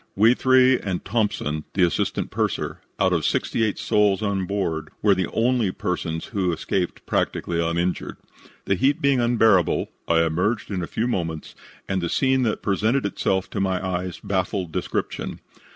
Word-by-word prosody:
"We 110 +4 +6
three 130 0 +4
and 95 -3 -4
Thompson, 95 -8 -1
the 95 - +3
assistant 85 - 0
purser, - - -2 0.2
out 95 -1 +3
of 85 -3 +1
sixty 115 - 0
eight 105 -2 0
souls 105 -2 +2
on 100 -3 -1
board, 80 -6 -2
were 105 -1 +6
the 95 -2 0
only 115 -3 +1
persons 80 -3 -3
who 95 -4 +1
escaped 90 +2 -2
practically 85 -1 -1
uninjured. 85 +2 -1 0.5
The - - +2
heat 135 +8 +2
being 140 -2 +3
unbearable, 115 -7 +3 0.2
I 85 0 +4
emerged 90 +8 -1
in 95 -2 -2
a 85 - -4
few 115 - -1
moments, 80 -8 -3 0.3
and 95 -1 -1
the 85 - -2
scene 130 -1 +2
that 115 -4 -1
presented 110 +6 +1
itself 95 -1 0
to 105 - -3
my 95 -1 +1
eyes 90 -1 -3
baffles 95 -2 -2
description. - - -3
95 Hz, 165 wpm, -23 LUFS, 90-110 Hz, 0.5 s, We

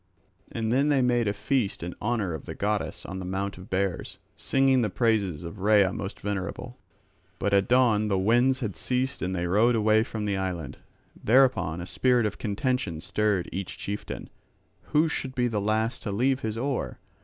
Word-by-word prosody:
And 115 -1 -2
then 140 +4 +3
they 140 -3 +3
made 120 -2 +2
a - - +2
feast 105 -3 -1
in 90 0 -4
honour 105 -5 -1
of 80 - -7
the - - -6
goddess 105 +1 -2
on 95 - -5
the - - -5
Mount 95 +1 -3
of 90 - -12
Bears, 95 -1 -2 0.2
singing 135 -1 +2
the 110 - +1
praises 100 - 0
of 85 +4 -8
Rhea 100 -1 +4
most 100 0 -5
venerable; 100 -3 -4 0.6
but 100 - -1
at 100 -1 +3
dawn 120 -4 +3
the 100 -2 +1
winds 120 +7 +3
had 105 -6 -3
ceased 130 +1 -1
and 95 +1 -1
they 90 0 -1
rowed 110 +7 +3
away 110 0 +4
from 110 -1 -4
the 100 -2 0
island. 90 -7 -4 0.4
Thereupon 120 -9 +3
a - - -5
spirit 125 +3 +2
of 105 - -3
contention 105 - -1
stirred 105 +1 0
each 95 -1 -5
chieftain, 100 +1 -6 0.5
who 155 +2 +3
should 135 -4 -4
be 125 -1 +2
the 110 -3 -1
last 110 +3 0
to 105 - -4
leave 130 +6 +1
his 110 -2 -3
oar. 135 +2 -2
105 Hz, 190 wpm, -27 LUFS, 95-125 Hz, 0.6 s, Rhea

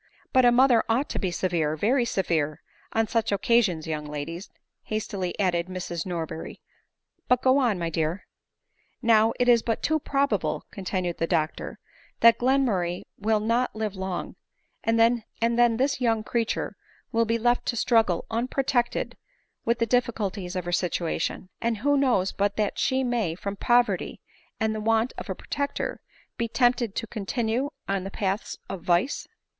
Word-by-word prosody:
" - - -34
But 255 -1 +5
a 240 - +7
mother 245 -1 +5
ought 245 +6 +1
to - - -2
be 190 - 0
severe, 170 -4 0
very 240 - +2
severe, 160 -8 -1 0.3
on 225 0 +1
such 225 -1 0
occasions, 200 -5 +2
young 155 -1 -3
ladies," 150 +5 -6 0.4
hastily 205 -4 -3
added 175 -3 +1
Mrs^ 180 -2 -4
Nor 170 -3 -2
berry; 160 - -8 0.4
" - - -50
but 250 0 +3
go 260 +2 +5
on, 235 -7 +2
my 170 -1 -2
dear." 160 +3 -1 0.4
" - - -50 0.3
Now 225 -1 +5
it 245 - +2
is 240 -2 +6
but 225 0 -2
too 315 0 +2
probable," 280 0 0
continued 185 -4 -3
the 165 - +1
doctor, 160 -3 -1 0.2
" - - -30
that 230 0 +7
Glenmurray 230 -10 +1 0.2
will 215 +1 +2
not 230 +3 0
live 215 -2 -3
long, 190 -1 -4 0.5
and 225 0 +2
then 230 0 +4 0.5
this 270 +1 0
young 225 -3 +2
creature 230 0 -1 0.4
will 230 0 +2
be 230 +1 +1
left 240 +1 +1
to 240 - 0
struggle 225 -7 +2
unprotected 245 +1 0 0.5
with 235 +1 +2
the 230 - +1
diffi 245 +1 +2
culties 195 -3 -3
of 180 -2 -2
her 175 - -3
situation; 175 0 -1
and 235 -1 0
who 285 +7 +2
knows 245 -9 +2
but 200 0 -1
that 210 -2 0
she 265 0 +1
may, 235 -10 0
from 200 +2 -5
poverty 240 +3 +1 0.4
and 220 -1 +1
the 215 - -4
want 225 +2 +2
of - - -8
a - - -2
protector, 285 -1 -3 0.4
be 235 -2 -1
tempted 240 -3 +1
to 230 - -2
continue 225 +4 -2 0.2
in 195 -1 -1
the 195 - -5
paths 195 +1 -2
of 185 - -6
vice?" 175 - +1
220 Hz, 170 wpm, -26 LUFS, 185-240 Hz, 0.5 s, a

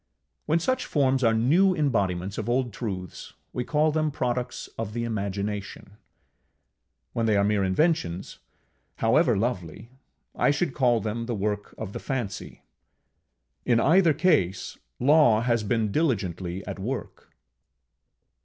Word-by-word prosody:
When 155 +2 +3
such 255 +10 -1
forms 135 -3 +2
are 115 -1 +4
new 170 +12 +4
embodiments 100 - 0
of 110 - -3
old 120 -2 0
truths, 95 -6 -6 0.2
we 125 - -2
call 155 +3 +2
them 155 0 +1
products 125 -3 -3
of 110 -2 -4
the 120 0 -2
Imagination; 100 -2 -4 1.2
when 115 -1 0
they 105 -2 +3
are 100 - +3
mere 105 -1 +2
inventions, 95 - 0 0.6
however - - +3
lovely, 100 -1 -3 0.4
I - - +2
should 145 0 0
call 120 -4 +2
them 115 +2 -3
the 120 - -2
work 105 0 -3
of 100 -3 -6
the - - -5
Fancy: 120 -8 -5 1.0
in 120 -2 +3
either 165 +3 +4
case, 145 - +1 0.2
Law 135 -5 +5
has 120 -1 +1
been 110 0 0
diligently 95 - -1
at - - -6
work. 125 +7 -5
115 Hz, 135 wpm, -26 LUFS, 100-140 Hz, 1.2 s, Law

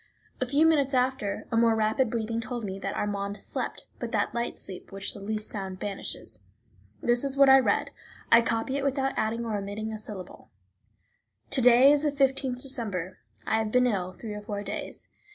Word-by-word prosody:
A 255 - +1
few 285 +5 +4
minutes 285 -4 +3
after, 250 -5 0
a - - 0
more 230 -1 +4
rapid 220 +3 +2
breathing 230 0 -2
told 240 -1 -4
me 195 0 -5
that - - -3
Armand 200 0 -2
slept, - - -5
but - - -4
that - - +1
light 235 0 -2
sleep 185 - -8
which 195 0 -3
the - - -9
least 215 +1 -3
sound 190 -3 -5
banishes. 190 - -3 0.6
This 240 +1 +3
is 275 0 -1
what 275 -1 +7
I 265 0 +9
read; 260 - +1 0.4
I 235 - +8
copy 230 +4 -1
it 280 - -2
without 270 -1 0
adding 225 +2 -1
or 220 -2 -2
omitting 205 +2 -4
a 215 - -5
syllable: 200 -4 -9 1.0
To 265 - +1
day 250 +3 +7
is 290 -1 +3
the 300 -1 +1
15th 270 -2 0
December. 205 - -3 0.3
I 220 - +2
have 220 -1 -1
been 250 +3 +4
ill 185 -6 -1
three 215 +3 -7
or 210 - -6
four 205 -1 -4
days. 200 - -6
225 Hz, 195 wpm, -28 LUFS, 205-260 Hz, 1.0 s, I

